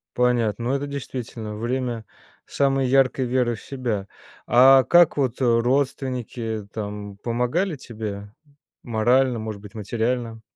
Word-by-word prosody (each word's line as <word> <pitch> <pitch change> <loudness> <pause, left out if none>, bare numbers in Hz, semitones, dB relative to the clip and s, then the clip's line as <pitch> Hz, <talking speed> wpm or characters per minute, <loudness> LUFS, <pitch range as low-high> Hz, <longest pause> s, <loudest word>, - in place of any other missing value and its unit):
Понятно, 120 -3 +1
ну 130 - 0
это 145 +1 -3
действительно 120 -6 -6
время 120 0 -3 0.4
самой 135 -2 +1
яркой 130 0 +3
веры 120 -1 +1
в - - -12
себя. 120 -7 -3 0.4
А 130 +2 +7
как 175 +2 +5
вот 130 -4 0
родственники 120 -3 0
там 105 -1 -6
помогали 125 - -1
тебе 105 -4 -7 0.5
морально, 120 +2 +2
может 110 -2 -6
быть 105 -1 -12
материально? 115 +2 -2
120 Hz, 120 wpm, -23 LUFS, 110-130 Hz, 0.5 s, А